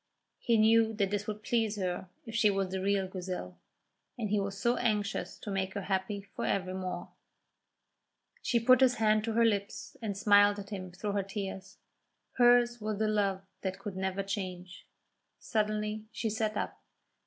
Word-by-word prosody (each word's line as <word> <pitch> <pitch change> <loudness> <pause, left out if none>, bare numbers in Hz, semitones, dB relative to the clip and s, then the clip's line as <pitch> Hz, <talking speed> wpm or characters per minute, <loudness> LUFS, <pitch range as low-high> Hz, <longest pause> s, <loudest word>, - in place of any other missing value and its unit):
He 235 -2 +2
knew 225 +1 +5
that 200 -2 0
this 205 +1 -2
would 210 0 -5
please 225 -1 +1
her 185 -2 -3 0.2
if 225 - -8
she 225 -2 +4
was 195 -1 0
the 190 0 -2
real 195 0 +1
Grizel, 180 - -6 0.6
and 215 -4 -3
he 210 - +3
was 195 0 -3
so 240 +3 +2
anxious 210 -2 -1
to 205 - -7
make 190 0 -2
her 200 - -3
happy 195 +1 -2
for - - -3
evermore. 185 -2 -2 1.3
She 235 - +2
put 255 +2 +5
his 255 -2 +5
hand 215 -1 +3
to 225 - -1
her 230 +1 +4
lips 200 -3 -1
and 205 -4 -3
smiled 205 0 +5
at 200 0 -8
him 185 -3 -5
through 200 +4 -4
her 200 0 +1
tears. 195 -1 -6 0.6
Hers 240 -1 +5
was 215 -1 -2
a 220 - +2
love 200 -3 +1 0.2
that 190 -1 -3
could 205 -3 -6
never 190 +1 -1
change. 185 -2 -5 0.5
Suddenly 215 0 -1
she 225 -3 -2
sat 215 0 -1
up. - - -4
205 Hz, 175 wpm, -31 LUFS, 190-220 Hz, 1.3 s, knew